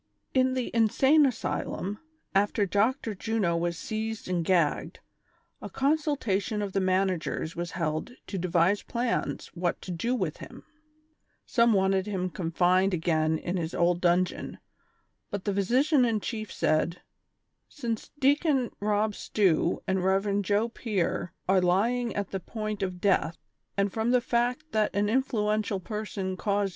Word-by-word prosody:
ilN 260 0 +3
the 255 -2 -2
insane 265 +7 +5
asylum, 210 -4 -3 0.3
after 205 +1 +2
Dr. 220 - +1
Juno 205 -4 0
was 170 0 -1
seized 220 +2 -4
and 180 -2 0
gagged, 170 -4 +1 0.6
a - - -6
consultation 270 -8 0
of 195 -2 -4
the 195 - +2
managers 185 -3 0
was 170 0 -4
held 155 +3 -2 0.2
to 195 - -4
devise 180 +3 +2
plans 240 0 -2
what 175 -1 -1
to 185 - -6
do 230 +9 -1
with - - -2
him; - - -11 0.8
some 235 -2 +3
wanted 190 0 +2
him 185 -3 -2
confined 180 +2 +2
again 160 -1 +1
in 175 +3 -3
his 165 -1 -3
old 175 0 +2
dungeon, 180 0 +1 0.7
but 200 -2 -5
the 205 - 0
physician 255 - +3
in 230 -3 +2
chief 215 0 -5
said: 165 +3 0 0.3
" - - -51 0.3
Since 235 -6 -4
Deacon 280 -2 +2
Hob 210 +1 +1
Stew 185 -5 +1
and 190 -1 0
Rev. 195 +2 +2
Joe 205 +3 +1
Pier 200 -7 -2 0.2
are 190 0 +4
lying 225 +7 +1
at 200 -2 -3
the 195 - -2
point 215 +1 -5
of 185 -2 -3
death, 185 -4 +2 0.4
and 200 -1 +1
from 220 +1 0
the 250 0 +5
fact 245 +6 -1
that 215 -2 +1
an 205 0 +2
influential 215 -4 0
person 195 -2 -4
caused 200 0 0
200 Hz, 150 wpm, -28 LUFS, 185-230 Hz, 0.8 s, insane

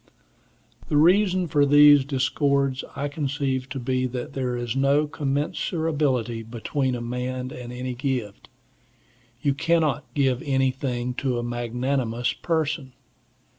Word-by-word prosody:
The 150 - +2
reason 185 +3 +4
for 145 -2 +3
these 145 0 +7
discords 140 0 0
I 140 +1 -2
conceive 140 -3 -2
to 135 +1 -4
be 130 +1 0
that 125 -1 -6
there 125 -2 -2
is 120 0 -3
no 140 +2 +3
commensurability 145 -4 -1
between 125 +4 -2
a 120 - -5
man 125 +1 -4
and 120 -1 -8
any 125 +1 -4
gift. 125 -5 -4 0.9
You 140 - +3
cannot 155 -1 0
give 130 -3 +2
anything 130 -2 -1
to 130 -3 0
a 120 - -2
magnanimous 120 0 -1
person. 155 -5 -2
135 Hz, 125 wpm, -24 LUFS, 125-145 Hz, 0.9 s, these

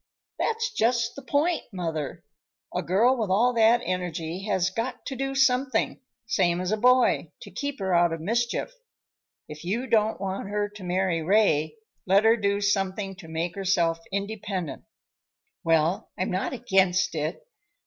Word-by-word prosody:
"That's 460 +1 0
just 235 - +1
the 280 - -8
point, 295 +6 +1
mother. 165 -6 -4 0.5
A - - +1
girl 225 +9 +3
with 220 -4 -1
all 235 +7 +3
that 230 +1 +4
energy 180 0 -3
has 190 -4 +1
got 240 +3 -4
to 270 - -4
do 270 +1 -3
something, 260 -2 +2 0.3
same 175 -5 +1
as 185 +1 -2
a 215 - +1
boy, 250 +3 +3
to - - -11
keep 285 -1 -4
her 190 -1 -1
out 170 -1 +4
of 165 - -3
mischief. 235 - -1 0.7
If 150 +1 -9
you 215 +9 -2
don't 220 -3 +2
want 195 0 -4
her 205 0 -1
to 205 -1 -12
marry 180 -2 0
Ray, 160 -4 +2 0.3
let 195 +3 +4
her 225 +1 +6
do 200 -2 0
something 195 -1 0
to 180 -4 -11
make 165 +2 -3
herself 180 -4 +1
independent." 200 -4 -4 0.8
"Well, 165 +1 +1
I'm 185 - -1
not 185 +1 -1
against 190 -7 +2
it. 155 0 -3
195 Hz, 160 wpm, -26 LUFS, 180-235 Hz, 0.8 s, her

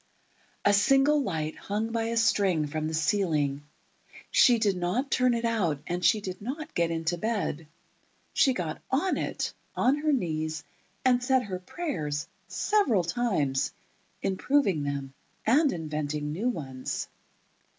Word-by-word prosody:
A 205 - +5
single 275 +8 +4
light 160 - -2
hung 215 +3 -3
by 225 0 0
a 230 0 -1
string 195 -8 +3
from 155 +1 -3
the 160 - -4
ceiling. 155 -4 +1 0.7
She 245 -2 +6
did 210 -4 +2
not 180 +10 -1
turn 255 -1 +3
it 230 0 -1
out, 190 -11 +1
and 175 +1 -3
she 215 +3 +4
did 185 0 -6
not 300 +8 -5
get 170 -1 +1
into 165 +1 -1
bed. 185 -8 -2 0.7
She 270 - +4
got 165 -7 -4
on 310 +9 +1
it, - - -2 0.2
on 265 +3 +3
her 305 +1 +1
knees, 160 - -1 0.4
and 250 -1 +4
said 260 0 +3
her 190 -4 -5
prayers—several 215 - -1
times—improving 190 - -1
them, 140 -1 -3 0.3
and 280 +5 +4
inventing 150 -2 -3
new 205 +11 0
ones. 135 - -4
195 Hz, 135 wpm, -28 LUFS, 155-245 Hz, 0.7 s, She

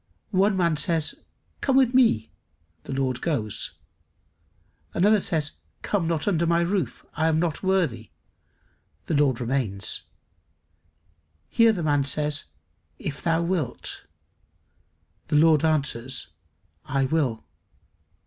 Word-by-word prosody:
One 195 0 +3
man 170 -4 +2
says, 160 -1 +1 0.4
"Come 270 -1 +2
with 260 -2 +4
me;" 230 - +3 0.5
the - - -6
Lord 130 -2 -1
goes. 115 - -2 1.2
Another 205 +4 +4
says, 155 -5 -1 0.3
"Come 190 -6 0
not 165 0 -1
under 170 -4 +2
my 170 0 +3
roof, 170 - -2
I 160 +1 +1
am 160 -1 +2
not 165 -3 -1
worthy;" 165 - 0 1.0
the - - -2
Lord 140 -5 +2
remains. 120 -6 -1 1.5
Here 230 -1 +5
the 180 -6 -3
man 145 -2 +2
says, 150 +1 +1 0.5
"If 140 -2 -5
thou 165 0 +1
wilt;" 170 -8 -3 1.2
the - - 0
Lord 155 0 +5
answers, 135 - -1 0.5
"I 135 -1 0
will." 130 -6 0
155 Hz, 115 wpm, -25 LUFS, 135-175 Hz, 1.5 s, Here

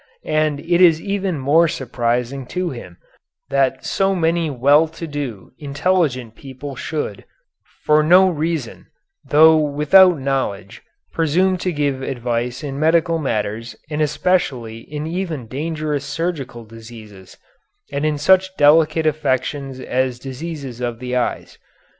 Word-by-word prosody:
And 155 -2 0
it 175 +3 +1
is 165 -3 +6
even 195 -3 -2
more 150 +5 +3
surprising 125 -1 -2
to 180 +3 -3
him 90 -9 -10 0.5
that 135 -1 +1
so 195 0 +1
many 165 -1 +1
well 145 +4 +4
to 160 +1 -8
do, 135 - -6
intelligent 145 -5 -1
people 135 +1 -9
should, 135 -9 -4 0.6
for 150 0 +5
no 180 +5 +6
reason, 165 -2 -3 0.4
though 160 +2 +6
without 155 +5 +5
knowledge, 125 -7 -3 0.3
presume 175 +4 +2
to 185 - -1
give 145 -4 -1
advice 120 0 -3
in 140 -1 -5
medical 165 +1 +2
matters 110 -4 -3 0.2
and 150 +1 -2
especially 145 -8 0
in 150 0 -4
even 165 -6 -4
dangerous 150 +3 -3
surgical 145 -5 -4
diseases, 110 -4 -13 0.5
and 140 +1 -2
in 155 -1 0
such 190 +5 +3
delicate 155 +2 +4
affections 140 -2 -1
as 130 -1 -1
diseases 135 -1 -7
of 120 -2 -3
the 125 +1 -4
eyes. 125 - -3
145 Hz, 130 wpm, -20 LUFS, 125-165 Hz, 0.6 s, is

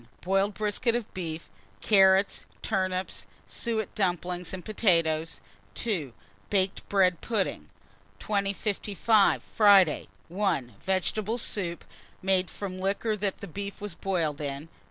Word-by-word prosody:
Boiled 195 +2 +1
brisket 220 +3 +1
of 240 -3 -4
beef, 165 -3 -5 0.3
carrots, 195 - +4 0.2
turnips, 185 -3 -1 0.2
suet 220 -4 -3
dumplings, 180 -2 -1
and 185 -1 -7
potatoes. 165 -7 +1 0.3
2. 180 - -1 0.4
Baked 190 -1 0
bread 185 -3 +3
pudding. 215 -5 -2 0.5
2055. 205 +1 +1
Friday. 200 -7 +5 0.2
1. 170 - -1
Vegetable 205 +4 0
soup, 180 -7 -1 0.3
made 190 -1 +1
from 185 -2 -6
liquor 200 +3 0
that 200 -3 -3
beef 200 0 -5
was 205 -3 -4
boiled 165 -5 -1
in. 140 +2 -4
190 Hz, 110 wpm, -28 LUFS, 175-205 Hz, 0.5 s, Friday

